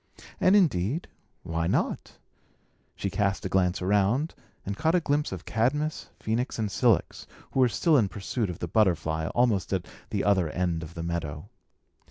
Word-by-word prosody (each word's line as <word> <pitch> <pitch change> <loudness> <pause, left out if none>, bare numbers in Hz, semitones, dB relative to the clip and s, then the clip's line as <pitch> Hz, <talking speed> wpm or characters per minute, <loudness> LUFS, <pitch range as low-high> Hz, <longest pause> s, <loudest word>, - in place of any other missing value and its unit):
And, 185 - +5
indeed, 150 - +2 0.4
why 80 0 -1
not? - - -1 0.8
She 100 - -3
cast 100 -1 0
a - - -1
glance 90 -1 +1
around, 105 - +2 0.3
and 100 - -3
caught 160 - +1
a - - +5
glimpse 145 -2 0
of 90 -2 -6
Cadmus, 150 +8 -1
Phœnix, 115 +4 -1
and 110 -3 -1
Cilix, 115 - +1 0.2
who - - -1
were 125 -1 +5
still 160 +6 +3
in 105 -4 +1
pursuit 105 +2 -3
of 85 - -5
the 85 - -4
butterfly, 80 -5 +1
almost 120 -6 +2
at 90 -2 -1 0.2
the - - -1
other 95 -5 +3
end 85 -1 -1
of 80 +1 -9
the 85 - -4
meadow. 80 -3 -4
100 Hz, 170 wpm, -27 LUFS, 85-125 Hz, 0.8 s, And